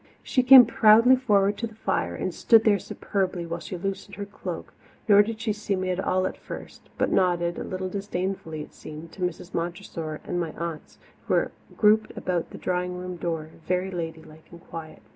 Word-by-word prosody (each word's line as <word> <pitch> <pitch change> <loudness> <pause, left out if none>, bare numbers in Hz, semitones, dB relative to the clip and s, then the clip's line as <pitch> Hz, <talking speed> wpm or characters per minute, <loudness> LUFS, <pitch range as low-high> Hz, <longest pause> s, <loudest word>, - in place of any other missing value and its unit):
She 255 - +2
came 255 0 +10
proudly 230 +2 +6
forward 205 -5 +2
to 230 - -2
the 220 - -16
fire 90 - -1
and 185 - -3
stood 225 +4 +5
there 205 -2 +4
superbly 185 -2 -2
while 170 +1 -4
she 180 - -6
loosened 195 +2 -5
her 200 - -5
cloak, 200 - -7 0.3
nor 205 -1 +8
did 220 +1 -3
she 225 -2 -1
see 205 -1 -2
me 185 0 -1
at 180 - -2
all 185 -1 +1
at - - -3
first, - - -10
but - - +1
nodded, 175 -2 +1
a - - -3
little 185 0 -4
disdainfully, 185 -5 -4
it - - -15
seemed, 155 +2 -10
to 195 - -12
Mrs. 180 0 -3
Montressor 170 -2 -4
and 175 - -2
my 165 -3 -3
aunts, 170 -2 -6 0.3
who - - +2
were - - +1 0.3
grouped 215 0 +3
about 175 -2 -2
the - - -9
drawing 180 0 -2
room 180 0 -5
door, 165 -2 -3 0.2
very 185 +1 0
ladylike 160 -2 -7
and 170 - -12
quiet. 160 -2 -9
185 Hz, 200 wpm, -26 LUFS, 170-205 Hz, 0.3 s, came